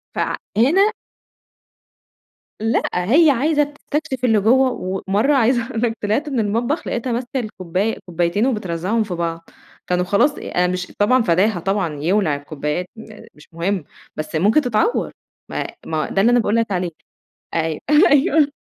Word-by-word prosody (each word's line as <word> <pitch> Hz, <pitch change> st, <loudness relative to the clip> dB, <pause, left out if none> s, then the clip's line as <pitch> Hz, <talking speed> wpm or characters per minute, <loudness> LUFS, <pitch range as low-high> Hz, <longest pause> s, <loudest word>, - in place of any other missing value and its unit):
فهنا 370 Hz, -, +1 dB, 1.7 s
لأ، 225 Hz, +1 st, +1 dB
هي 270 Hz, -, +4 dB
عايزة 295 Hz, +4 st, +2 dB
تستكشف 285 Hz, -2 st, -4 dB
اللي 225 Hz, -3 st, +4 dB
جوّه، 255 Hz, +5 st, +4 dB, 0.4 s
ومَرّة 215 Hz, +9 st, +2 dB
عايزة 240 Hz, -2 st, +2 dB
اقول 225 Hz, -3 st, -3 dB
لَك 230 Hz, -2 st, 0 dB
طلِعت 220 Hz, +9 st, 0 dB
من 265 Hz, -, -1 dB
المطبخ 230 Hz, +9 st, -1 dB
لقيتها 245 Hz, +1 st, -2 dB
ماسكة 245 Hz, +3 st, -2 dB
الكوباية 200 Hz, -2 st, -3 dB
كوبايتين 175 Hz, +5 st, 0 dB
وبترزّعهم 210 Hz, -1 st, -1 dB
في 195 Hz, -4 st, -5 dB
بعض، 165 Hz, -1 st, -4 dB, 0.4 s
كانوا 180 Hz, 0 st, +1 dB
خلاص، 205 Hz, +10 st, +3 dB
أنا 180 Hz, 0 st, -1 dB
مش 180 Hz, 0 st, -3 dB
طبعًا 255 Hz, +5 st, +4 dB
فداها 185 Hz, +2 st, +2 dB
طبعًا 180 Hz, -5 st, -2 dB
يولع 175 Hz, -3 st, +2 dB
الكوبايات، 150 Hz, +4 st, -4 dB
م 220 Hz, -1 st, -12 dB
مش 150 Hz, -, -17 dB
مُهِم 175 Hz, +2 st, -1 dB, 0.3 s
بس 155 Hz, +1 st, -5 dB
ممكن 210 Hz, -, +3 dB
تتعوَّر، 250 Hz, -, 0 dB, 0.4 s
ما -, -, -3 dB, 0.2 s
ما 155 Hz, -1 st, -2 dB
ده 195 Hz, -, +1 dB
اللي 235 Hz, +4 st, +4 dB
أنا 245 Hz, -, +4 dB
باقول 220 Hz, -1 st, 0 dB
لَك 230 Hz, -3 st, 0 dB
عليه. 180 Hz, -2 st, -1 dB, 0.6 s
أيوه، 160 Hz, -2 st, -1 dB, 0.3 s
أيوه، 290 Hz, +1 st, +4 dB
215 Hz, 150 wpm, -20 LUFS, 180-255 Hz, 1.7 s, هي